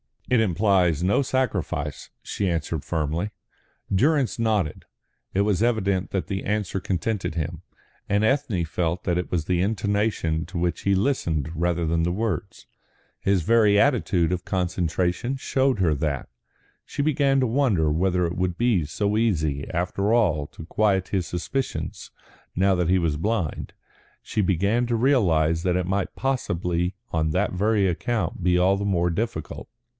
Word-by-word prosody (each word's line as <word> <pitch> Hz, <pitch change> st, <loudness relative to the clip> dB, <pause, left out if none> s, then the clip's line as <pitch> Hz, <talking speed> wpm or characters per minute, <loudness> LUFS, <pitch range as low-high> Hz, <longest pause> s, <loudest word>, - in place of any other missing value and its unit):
"It 125 Hz, -, +5 dB
implies 90 Hz, -5 st, +2 dB
no 100 Hz, +8 st, +3 dB
sacrifice," 95 Hz, -, -2 dB
she 100 Hz, -2 st, -2 dB
answered 80 Hz, -2 st, -2 dB
firmly. 80 Hz, +5 st, -2 dB, 0.6 s
Durrance 135 Hz, +4 st, +2 dB
nodded. 105 Hz, -9 st, 0 dB, 0.5 s
It 95 Hz, -, +2 dB
was 100 Hz, -1 st, +1 dB
evident 100 Hz, -5 st, +1 dB
that 95 Hz, -, -2 dB
the 95 Hz, -1 st, -3 dB
answer 105 Hz, -2 st, -1 dB
contented 95 Hz, 0 st, -2 dB
him, 80 Hz, 0 st, -3 dB, 0.5 s
and 100 Hz, +2 st, +1 dB
Ethne 110 Hz, -7 st, +1 dB
felt 85 Hz, +2 st, -2 dB
that 90 Hz, -1 st, 0 dB
it 90 Hz, -, -2 dB
was 85 Hz, -4 st, -1 dB
the 90 Hz, 0 st, +1 dB
intonation 100 Hz, -5 st, 0 dB
to -, -, -7 dB
which 85 Hz, 0 st, -1 dB
he 100 Hz, 0 st, +3 dB
listened 85 Hz, -, 0 dB
rather 85 Hz, 0 st, 0 dB
than 85 Hz, +1 st, +1 dB
the 85 Hz, +1 st, 0 dB
words. 105 Hz, -5 st, -3 dB, 0.5 s
His 95 Hz, -3 st, +1 dB
very 105 Hz, 0 st, +4 dB
attitude 105 Hz, -, +2 dB
of 90 Hz, 0 st, -2 dB
concentration 90 Hz, +5 st, -1 dB
showed 135 Hz, -2 st, 0 dB
her 85 Hz, -5 st, +3 dB
that. 70 Hz, -1 st, -2 dB, 0.6 s
She -, -, -4 dB
began 140 Hz, -2 st, +2 dB
to -, -, +3 dB
wonder 110 Hz, -, +2 dB
whether 90 Hz, +3 st, +1 dB
it 85 Hz, +1 st, -3 dB
would 90 Hz, -1 st, -1 dB
be 115 Hz, -9 st, +2 dB
so 100 Hz, +7 st, -1 dB
easy 80 Hz, -11 st, 0 dB
after 95 Hz, +5 st, 0 dB
all 85 Hz, -11 st, +2 dB
to 80 Hz, -, -11 dB
quiet 95 Hz, 0 st, +1 dB
his 95 Hz, -4 st, -1 dB
suspicions 130 Hz, +10 st, -4 dB, 0.5 s
now 95 Hz, +2 st, +3 dB
that 90 Hz, -2 st, 0 dB
he 95 Hz, -, +4 dB
was 80 Hz, -4 st, 0 dB
blind; 100 Hz, -2 st, -2 dB, 0.5 s
she 105 Hz, -, -1 dB
began 100 Hz, +6 st, +1 dB
to 120 Hz, -, 0 dB
realise 85 Hz, -, +2 dB
that 90 Hz, -1 st, +1 dB
it 90 Hz, -, -1 dB
might 95 Hz, +1 st, -2 dB
possibly 90 Hz, -9 st, -1 dB, 0.2 s
on 80 Hz, -1 st, 0 dB
that 95 Hz, +5 st, +1 dB
very 105 Hz, +2 st, +2 dB
account 95 Hz, +1 st, -1 dB
be 90 Hz, 0 st, +3 dB
all 95 Hz, +2 st, +3 dB
the 100 Hz, -, -3 dB
more 90 Hz, -3 st, +1 dB
difficult. 110 Hz, +7 st, -4 dB
95 Hz, 160 wpm, -24 LUFS, 85-110 Hz, 0.6 s, It